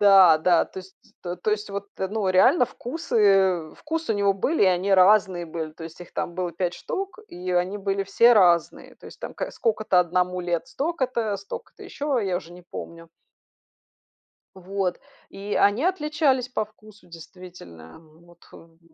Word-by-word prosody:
Да, 195 -5 +7
да, 170 +1 +3
то - - -23
есть, 190 +1 -16 0.3
то 180 +3 -3
есть 210 -1 -2
вот, 200 0 -5
э, 190 - -1
ну 210 -2 -2
реально 250 - +5
вкусы 200 - +1
вкусы 320 -5 -3
у - - -2
него 200 -1 +2
были 275 - 0
и - - +4
они 185 +2 +1
разные 185 -2 +4
были, 160 -1 -5
то 165 +1 -10
есть 165 +1 -11
их 175 - -12
там 170 - -3
было 180 -2 -3
5 175 +1 -2
штук 390 -1 -5
и 180 +1 -6
они 180 +3 0
были 195 0 -1
все 235 +4 +5
разные. 175 -4 +2
То - - -15
есть - - -13
там - - -6
к - - -4
сколько-то 215 - +1
одному 180 +1 0
лет- 175 +7 -2
столько-то, 260 -7 -2
столько-то 200 - -10
еще, 285 -4 -2
я 185 -2 -1
уже 175 -1 -8
не 180 0 -13
помню. 165 0 -9 1.5
Вот. 190 -1 -3 0.3
И 200 +1 -5
они 205 +8 +3
отличались 300 -7 +1
по 220 -4 -2
вкусу, 215 0 -19
действительно, 165 - -13
м, 160 +1 -20
вот 175 0 -20
х - - -16
м. 165 0 -19
190 Hz, 175 wpm, -24 LUFS, 175-215 Hz, 1.5 s, Да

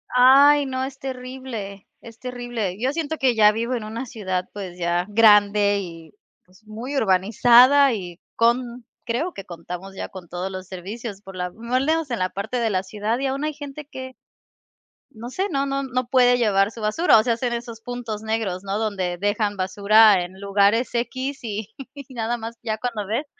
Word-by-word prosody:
Ay 280 +3 +7
no, 260 0 -3
es 270 0 -6
terrible, 255 -6 -7
es 230 -1 -13
terrible. 240 -6 -4
Yo 260 +3 0
siento 315 -1 -3
que 255 -3 +2
ya 210 -1 +6
vivo 230 +3 -2
en 225 - -4
una 230 +4 -5
ciudad, 185 -6 -3
pues, 185 -3 -7
ya 175 +1 0
grande 205 -1 +5
y, 165 -3 -10 0.3
pues, 185 +4 -24
muy 235 +7 -6
urbanizada 240 +6 +5
y 180 -4 -6 0.2
con 235 0 +1 0.2
creo 260 +10 -2
que 195 - -9
contamos 180 +3 -8
ya - - -5
con 185 -3 -11
todos 180 +3 -5
los 185 -1 -7
servicios 200 +3 -7
por 195 -2 -12
la 180 0 -2
por 225 - -16
lo 255 +3 0
menos 320 -2 0
en 235 - -2
la 185 0 0
parte 220 +5 -4
de 230 -1 +1
la 185 -2 0
ciudad 210 +4 -2
y 275 - -1
aún 275 +2 -2
hay 305 - -2
gente 290 0 -9
que 260 -2 -9 1.0
no 230 +2 -8
sé, 380 +9 -2
no 275 -3 0
no 275 0 -2
no 255 -2 -2
puede 245 -1 +5
llevar 205 -3 +2
su 225 - -10
basura, 225 +5 +4
o 215 - +4
sea, 235 -1 +1
hacen 240 +1 -2
esos 235 -1 -6
puntos 235 -3 -5
negros, 215 -4 -2
¿no?, 200 +1 -2
donde 190 -5 -2
dejan 205 +2 0
basura 200 +1 +4
en 185 +2 -10
lugares 200 +5 +2
X, 260 +4 -2
y 215 0 -5 0.4
nada 240 -1 -2
más 230 0 -7
ya 220 -2 -2
cuando 220 -4 -4
ves, 235 +8 -1
225 Hz, 190 wpm, -23 LUFS, 200-255 Hz, 1.0 s, Ay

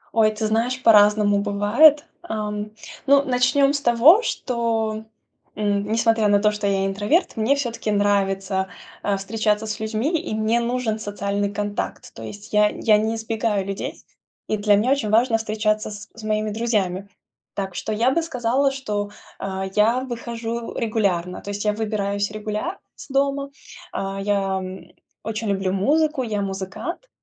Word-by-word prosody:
Ой, 220 -1 +5
ты 215 +1 -3
знаешь, 240 +4 0
по-разному 210 -2 +5
бывает. 210 +10 +4 0.2
Ам, 210 -8 -4 0.4
ну 280 0 +6
начнем 260 +2 +3
с 285 - -1
того, 265 - +6
что, 225 - -2 0.5
м, 205 -1 0
несмотря 225 -1 +3
на 205 0 +4
то, 210 +1 +3
что 210 -1 -2
я 195 -1 +1
интроверт, 205 - +1
мне 225 +6 +2
всё-таки 235 -5 -3
нравится, 195 -1 +1 0.3
а, 200 -1 0
встречаться 210 +2 0
с 215 0 -4
людьми, 230 +10 -1
и - - -1
мне 220 +2 +1
нужен 235 -2 -1
социальный 200 -1 -2
контакт. 205 0 -4
То 115 - -11
есть, 205 - -10
я 210 0 +5
я 215 -1 +3
не 220 +2 0
избегаю 220 -3 -1
людей, 195 0 -5 0.4
и 215 - 0
для 205 0 +4
меня 225 +6 +2
очень 275 -7 +1
важно 225 +1 +3
встречаться 215 -1 -1
с 205 -2 -9
с 225 - -11
моими 215 0 -1
друзьями. 200 -4 -1 0.5
Так 195 -2 -3
что 215 - -4
я 230 +5 +2
бы 335 +5 +1
сказала, 265 -2 +1
что, 210 -6 -3 0.3
а, 190 0 -3
я 230 +4 +3
выхожу 235 -2 -5
регулярно, 195 -6 -1
то 200 - -8
есть 205 +1 -4
я 210 - +2
выбираюсь 205 -2 -1
регулярно 215 - -4 0.2
из - - -11
дома. 275 +1 0 0.4
А, 195 0 -4
я, 195 -1 0
м, 185 0 -9 0.3
очень 220 0 -3
люблю 190 -1 0
музыку, 295 +8 +2
я- 210 -3 -2
музыкант. 195 - -5
215 Hz, 160 wpm, -22 LUFS, 205-235 Hz, 0.5 s, ну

